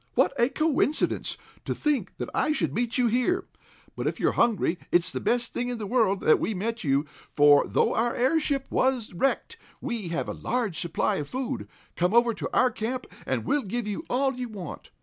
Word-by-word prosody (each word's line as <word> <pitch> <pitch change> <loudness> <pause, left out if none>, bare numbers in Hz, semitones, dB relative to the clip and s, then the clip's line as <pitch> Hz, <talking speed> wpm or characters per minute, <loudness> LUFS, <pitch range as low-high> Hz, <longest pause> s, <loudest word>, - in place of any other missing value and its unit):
What - - +3
a 240 - +4
coincidence! 310 0 0 0.3
To - - -2
think 300 -3 -1
that - - -5
I 305 - +2
should 165 - -1
meet 240 - -1
you 250 - +3
here! 250 +10 +1 0.5
But - - -2
if - - -2
you're - - +3
hungry, 210 -7 +1
it's 175 -1 +3
the - - -3
best 240 -1 0
thing 245 0 -2
in 245 - -3
the 215 - -5
world 210 -3 +2
that 155 - +5
we 220 - -1
met 225 +4 -3
you, 140 0 +2 0.3
for, 145 -1 +6
though - - +2
our 235 +1 +1
airship 275 +1 +1
was 255 -6 +1
wrecked, 270 +11 -1 0.2
we 235 -8 -3
have 170 0 -2
a - - -3
large 230 -9 -2
supply 170 -3 0
of 145 - -4
food. 260 -1 -3 0.3
Come 180 +5 +1
over 235 0 +5
to - - -4
our 255 -1 +3
camp, 250 +4 -3 0.2
and - - -1
we'll 290 +1 +2
give 235 +2 -3
you 210 +9 -3
all 270 +2 +1
you 250 -1 -5
want!" 195 -7 -8
235 Hz, 205 wpm, -27 LUFS, 195-260 Hz, 0.5 s, for